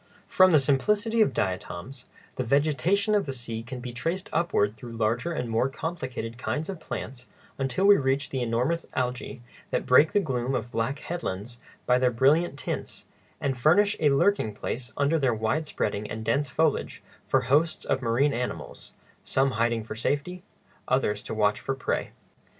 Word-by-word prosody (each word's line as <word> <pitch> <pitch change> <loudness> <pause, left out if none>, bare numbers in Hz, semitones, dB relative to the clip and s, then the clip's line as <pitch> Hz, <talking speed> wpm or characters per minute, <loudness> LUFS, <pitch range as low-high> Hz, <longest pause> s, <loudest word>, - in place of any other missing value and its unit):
From 185 0 +5
the 155 - +6
simplicity 210 - +2
of 215 - +4
diatoms 95 +6 -4 0.3
the 130 - -1
vegetation 155 - +2
of 205 -6 +2
the - - -1
sea 115 -3 -5
can 125 +2 -7
be 125 0 -7
traced 170 +10 -3
upward 130 -11 +1
through 120 0 -9
larger 115 +8 0
and 125 -7 -2
more 115 +3 +1
complicated 130 -7 -5
kinds 155 +5 -2
of 190 -4 -5
plants 125 -5 -6 0.3
until 135 +8 0
we 205 0 +8
reach 135 +1 0
the 130 - -2
enormous 125 +8 0
algæ 125 -1 -2 0.3
that - - -1
break 145 +5 +6
the 205 - +4
gloom 130 -6 -1
of 120 - -3
black 115 +5 -1
headlands 120 - -5 0.3
by 125 0 +4
their 125 0 +3
brilliant 140 +6 +2
tints, - - -5 0.3
and 135 -2 -2
furnish 200 +10 +4
a 150 - +4
lurking 140 - +2
place 120 +2 -5
under 145 +3 +2
their 130 -5 +2
wide 110 +9 -1
spreading 105 -5 -2
and 110 +1 -5
dense 140 +5 +1
foliage 155 +2 0 0.2
for - - +3
hosts 155 +4 +1
of 135 - 0
marine 130 +4 +2
animals—some 130 +2 -3
hiding 115 -1 0
for 110 - -7
safety, 145 +10 -2 0.5
others 105 -6 +1
to 110 - -6
watch 105 -1 +2
for 135 - -3
prey. 130 - -2
130 Hz, 170 wpm, -27 LUFS, 115-155 Hz, 0.5 s, we